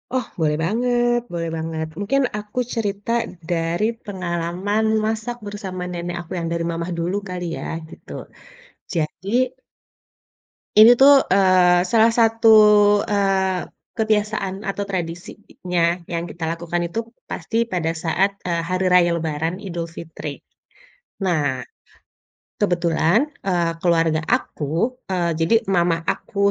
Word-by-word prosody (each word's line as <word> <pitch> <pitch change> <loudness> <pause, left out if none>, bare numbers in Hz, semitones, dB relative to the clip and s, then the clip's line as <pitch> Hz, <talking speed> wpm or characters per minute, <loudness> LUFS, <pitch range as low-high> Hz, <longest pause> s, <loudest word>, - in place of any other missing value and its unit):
Oh, 255 - 0
boleh 150 -1 +1
banget 240 +4 +1
boleh 165 -1 -2
banget, 160 0 -3
mungkin 275 +7 +1 0.2
aku 210 +4 -5
cerita 205 -1 -2 0.4
dari 170 +4 0 0.2
pengalaman 185 +2 -2 0.2
masak 220 +2 -2
bersama 195 -3 -6
nenek 175 0 -4
aku 170 - -16
yang 165 - -3
dari 170 0 -1
mama 170 +1 -3
dulu 175 +4 -1
kali 180 -1 -4
ya, - - -6 0.2
gitu. - - -14 0.8
Jadi 165 +4 -3 1.5
ini 220 +3 +9
tuh, 275 0 +8
eee, 185 -2 +5
salah 225 +2 +4
satu, 225 -1 +5 0.5
eee, 195 -2 +1 0.3
kebiasaan 210 -3 0
atau 200 -1 -3
tradisinya 175 -1 -3
yang 170 0 -4
kita 165 -1 -5
lakukan 170 +1 -2
itu 175 +7 -3 0.3
pasti 230 0 -1
pada 170 -6 -2
saat, 185 +5 0
eee, 170 -2 -1
hari 185 +2 -1
raya 175 -1 +5
Lebaran 165 +3 -3
Idul 170 -3 -4
Fitri. 160 -3 -8 0.8
Nah, 145 -8 0 1.0
kebetulan, 175 - +2 0.2
eee, 175 -3 +1
keluarga 165 -2 +2
aku, 170 - -1
eee, 175 -3 0
jadi 165 +8 +3
mama 170 -2 +2
aku 200 +4 0
180 Hz, 120 wpm, -21 LUFS, 170-205 Hz, 1.5 s, ini